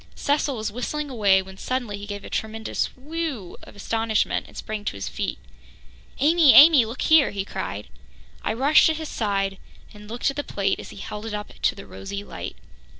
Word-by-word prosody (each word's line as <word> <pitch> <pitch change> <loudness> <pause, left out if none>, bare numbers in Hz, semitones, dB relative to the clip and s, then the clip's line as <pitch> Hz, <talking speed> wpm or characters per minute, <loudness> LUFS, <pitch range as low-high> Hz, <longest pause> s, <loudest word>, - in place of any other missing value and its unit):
Cecil 285 -2 0
was 215 -1 -3
whistling 285 +5 -3
away 200 -5 +4
when 190 0 -13
suddenly 250 -5 -2
he 205 - -8
gave 205 -1 -6
a - - -8
tremendous 220 0 -2
"whew" 290 - -4
of - - -14
astonishment 225 +1 0
and - - -14
sprang 215 -1 -5
to - - -1
his 100 - -5
feet. - - -3 0.8
"Amy, 310 0 +6
Amy, 295 -5 +9
look 230 +4 -5
here!" 315 -3 +6
he 195 -1 -4
cried. 105 - -5 0.6
I - - 0
rushed 275 +6 +5
to 320 - +1
his 315 -1 -5
side 195 -3 -1 0.3
and 210 0 -13
looked 240 +4 0
at 275 - -12
the 290 - -1
plate 195 -5 -1
as - - -9
he - - -12
held 210 +2 -6
it 215 - -3
up 210 0 -6
in - - 0
the 195 - -10
rosy 200 +1 -7
light. - - -7
220 Hz, 200 wpm, -24 LUFS, 200-280 Hz, 0.8 s, Amy